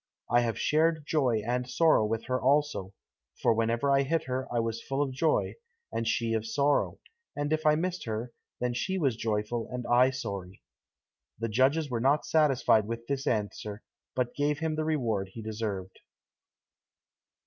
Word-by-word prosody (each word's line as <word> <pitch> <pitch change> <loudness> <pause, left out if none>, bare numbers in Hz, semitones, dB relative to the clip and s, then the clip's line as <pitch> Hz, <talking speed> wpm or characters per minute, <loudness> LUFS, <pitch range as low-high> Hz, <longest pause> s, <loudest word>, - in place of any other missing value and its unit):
I 120 - +5
have 115 -3 -1
shared 160 0 +2
joy 125 -9 +1
and 125 +1 -1
sorrow 160 -2 +4
with 115 +1 -2
her 130 0 -1
also, 135 -9 +1 0.4
for - - +3
whenever 115 +5 +1
I 135 0 +5
hit 160 +4 0
her 130 0 -3
I 120 - +1
was 115 0 -2
full 135 0 -3
of 135 - -3
joy, 155 +4 +1 0.4
and 115 - -2
she 115 0 0
of 110 -1 0
sorrow, 140 +5 +1 0.4
and 145 +1 -1
if 155 0 0
I 150 - +6
missed 180 +3 -2
her, 115 +2 -3 0.3
then 125 0 0
she 190 +10 -1
was 140 -9 +1
joyful, 110 +1 -2
and 125 -1 -4
I 125 +2 +5
sorry." 100 -8 -6 0.7
The 115 +1 -2
judges 135 +6 +2
were 115 -2 -1
not 140 +4 +3
satisfied 135 -8 +3
with 115 0 -5
this 140 +2 -3
answer, 105 -1 -2 0.3
but 125 -1 -1
gave 145 0 0
him 160 0 -1
the 155 0 -1
reward 115 -11 0
he 115 - -7
deserved. 105 -4 -4
125 Hz, 170 wpm, -29 LUFS, 115-145 Hz, 0.7 s, I